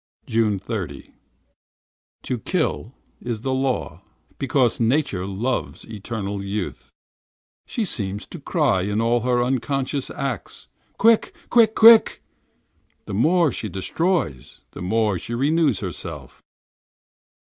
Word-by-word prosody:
30th 105 -4 0
June. 90 - -5 1.1
To 125 - -3
kill 155 - -2 0.3
is 115 -3 -4
the 130 +2 -1
law, 130 -1 -2 0.4
because 130 -3 +1
nature 115 -6 +1
loves 115 +6 -3
eternal 100 -2 -5
youth. 100 0 -4 0.8
She 230 - -2
seems 100 - -4
to 175 - -10
cry 140 - +1
in 105 +3 -1
all 115 +1 +2
her 120 +1 +1
unconscious 135 +2 -1
acts: 120 - -5 0.3
"Quick! 225 +1 +3 0.2
quick! 225 -2 +5
quick!" 225 0 +7 0.8
The - - -6
more 160 - +3
she 110 - -4
destroys, 95 - -2
the - - -9
more 105 0 +1
she 120 +7 -5
renews 145 - +2
herself. - - -7
120 Hz, 115 wpm, -23 LUFS, 105-145 Hz, 1.1 s, quick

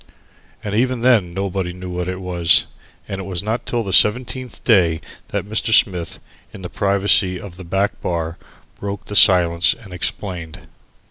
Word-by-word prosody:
And 105 - -4
even 125 +2 0
then 115 -8 +3
nobody 95 -1 -3
knew 90 0 -8
what 90 0 -4
it 95 0 -4
was, 85 -2 +3 0.4
and 95 - -5
it - - -6
was 90 -1 -3
not 110 +3 -3
till 120 -1 -1
the 95 -3 -5
seventeenth 125 +3 +2
day 85 -8 +3 0.3
that - - -4
Mr. 110 +2 0
Smith, 90 -7 +2 0.3
in 95 - -11
the 90 - -6
privacy 100 -1 +2
of 95 -4 -10
the 95 - -10
back 95 +4 -2
bar, 85 -1 -3 0.4
broke 100 0 -6
the 105 - -7
silence 85 -3 +5
and 105 -6 -14
explained. 90 -3 -4
95 Hz, 165 wpm, -19 LUFS, 90-105 Hz, 0.4 s, silence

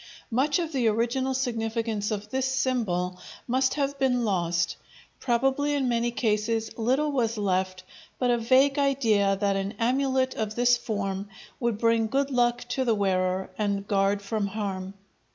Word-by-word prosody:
Much 275 +7 +2
of 335 -3 -2
the 255 -6 +1
original 235 +4 +1
significance 225 -4 -1
of 210 -1 -4
this 265 0 0
symbol 220 -9 -1 0.3
must 260 +1 +1
have 280 -1 -1
been 250 -3 +2
lost; 175 -3 0 0.4
probably 270 +4 +1
in 270 -3 0
many 235 0 +1
cases 225 -1 -1
little 260 +7 +1
was 230 -4 0
left 185 -2 -1 0.3
but 250 -1 +1
a 240 - +3
vague 270 +5 +3
idea 225 -8 +2
that 200 0 0
an 195 +1 -2
amulet 260 +2 +1
of 215 -1 -3
this 245 0 +4
form 200 -4 -3 0.3
would 235 -4 0
bring 230 0 +2
good 275 +4 0
luck 240 -1 +2
to 260 +2 -1
the 230 -3 +2
wearer 190 -2 0
and 200 -1 -1
guard 200 0 +1
from 205 0 -1
harm. 195 -2 -4
230 Hz, 155 wpm, -26 LUFS, 200-260 Hz, 0.4 s, this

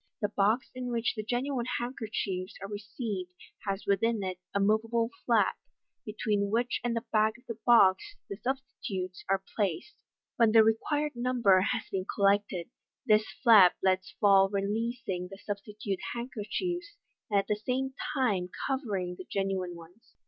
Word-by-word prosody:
The 205 - 0
box 210 +5 +1
in 250 -1 -5
which 235 0 0
the 215 - -4
genuine 245 +3 -2
handkerchiefs 215 -6 -3
are 195 - -6
received 205 -2 -5 0.4
has 195 0 -2
within 205 +2 +1
it 185 -1 -4
a 200 - 0
moveable 225 +3 +1 0.2
flap, - - +3 0.5
between 210 -1 0
which 235 +3 0
and 240 -1 0
the 230 - -3
back 215 +1 +3
of 250 - -23
the 230 -1 -6
box 235 - +5
the 200 - -6
substitutes 220 -7 -4
are 195 0 +1
placed. 200 - -1 0.4
When 230 -2 +4
the 225 -1 +8
required 290 +7 +1
number 240 -6 +3
has 225 +4 0
been 190 -1 -2
collected, 200 -1 +1 0.3
this 215 -2 +4 0.2
flap 210 -7 +8
is - - -43
let 185 0 +3 0.2
fall 195 -1 +6
releasing 200 -1 -2
the 195 +1 -10
substitute 205 -1 -5 0.2
handkerchiefs, 305 - -4 0.3
and 205 - +2
at 195 - -1
the 210 0 -1
same 265 +1 -1 0.2
time 205 -10 +1 0.2
cover 265 -7 -1
ing 180 -1 -4
the 185 - -9
genuine 190 -2 -2
ones. 170 +6 -16
215 Hz, 155 wpm, -30 LUFS, 195-240 Hz, 0.5 s, the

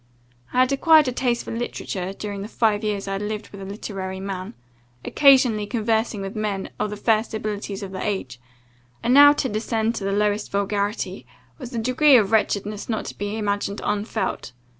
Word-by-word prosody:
I 255 - +3
had 255 +1 +3
acquired 310 +1 +5
a - - +1
taste 245 -1 -1
for - - -5
literature, 190 -5 -4
during 200 0 -6
the 200 - -5
five 215 -1 +1
years 205 -2 -2
I 195 - -2
had 195 - -3
lived 210 +1 -4
with 200 - -11
a - - -6
literary 190 -1 -5
man, 190 -6 -5 0.5
occasionally 255 -7 +4
conversing 220 -2 0
with 195 +2 -6
men 210 -3 -3
of 210 - 0
the 210 - -6
first 220 +1 +1
abilities 205 -2 -4
of 190 - -6
the 185 - -5
age; 165 - -3 0.6
and 245 - +2
now 290 +1 +9
to 290 - -1
descend 225 0 -1
to 220 - -5
the 195 - -1
lowest 210 +1 0
vulgarity, 200 - -2 0.3
was 245 - -8
a - - -2
degree 255 +4 +5
of 210 -3 +1
wretchedness 210 -1 0
not 220 - -2
to - - -7
be 205 +2 -3
imagined 205 -1 -2
unfelt. 210 - -2
210 Hz, 190 wpm, -23 LUFS, 200-230 Hz, 0.6 s, now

